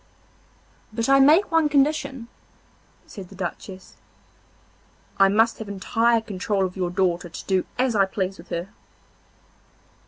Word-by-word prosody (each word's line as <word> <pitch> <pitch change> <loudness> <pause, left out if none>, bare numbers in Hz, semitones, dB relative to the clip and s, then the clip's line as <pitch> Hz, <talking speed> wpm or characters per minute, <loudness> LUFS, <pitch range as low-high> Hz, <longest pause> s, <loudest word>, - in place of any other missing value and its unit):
'But 225 +1 -2
I 275 0 +6
make 315 +9 +5
one 325 -2 +3
condition,' 275 -3 0 0.8
said 190 -4 -10
the 195 - -13
Duchess; 185 +1 -7 1.2
'I 195 - +7
must 225 +3 +2
have 220 -2 -7
entire 225 +4 +1
control 200 -2 -2
of 180 - -6
your 180 -2 -2
daughter 180 -1 -1
to 165 - -9
do 190 -2 0
as 250 -2 +1
I 195 -2 +4
please 190 0 -4
with - - -14
her. 170 +3 -4
205 Hz, 135 wpm, -23 LUFS, 190-245 Hz, 1.2 s, I